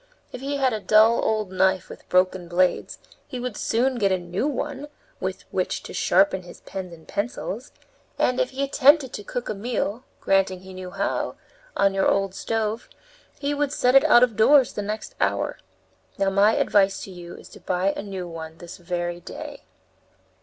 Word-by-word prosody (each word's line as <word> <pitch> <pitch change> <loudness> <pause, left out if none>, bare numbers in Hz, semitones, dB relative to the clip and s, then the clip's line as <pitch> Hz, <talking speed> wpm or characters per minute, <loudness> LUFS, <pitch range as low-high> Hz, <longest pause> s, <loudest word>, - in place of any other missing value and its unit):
If 250 - -8
he 280 +1 -2
had 265 -3 +2
a 215 - -2
dull 220 +3 +5
old 215 -3 0
knife 190 0 +2
with - - -13
broken 185 -1 +2
blades, 180 +1 +1 0.3
he 255 - -6
would 245 -3 -4
soon 245 +4 0
get 200 -3 +2
a 190 - +3
new 180 +8 -2
one 290 0 -3 0.3
with - - -4
which - - -2
to - - -9
sharpen 295 -11 +3
his 175 - -13
pens 190 -2 -7
and 160 -1 -14
pencils, 245 - -4 0.5
and, 250 0 +1
if 255 0 +1
he 275 +1 -3
attempted 275 0 +4
to 205 - -6
cook 245 +4 -5
a - - -1
meal 225 +2 -3 0.2
granting 190 -1 +1
he 190 0 -11
knew 185 0 -7
how 195 +2 -2 0.4
on 195 0 +3
your 195 0 +2
old 195 -1 +1
stove, 225 +2 -2 0.5
he 285 0 -1
would 290 -1 0
set 250 -3 +2
it 270 - +7
out 240 - +7
of 240 -4 +2
doors 255 +4 +5
the 210 - -3
next 215 +2 -5
hour. - - 0 0.6
Now 195 -1 +1
my 205 +3 +4
advice 195 -1 +2
to 195 - -8
you 175 -1 -9
is - - -13
to - - -13
buy 185 +2 0
a - - -4
new 190 -3 -6
one 160 -1 -8
this 175 0 -10
very 175 -1 -3
day!" - - -9
200 Hz, 190 wpm, -24 LUFS, 185-250 Hz, 0.6 s, it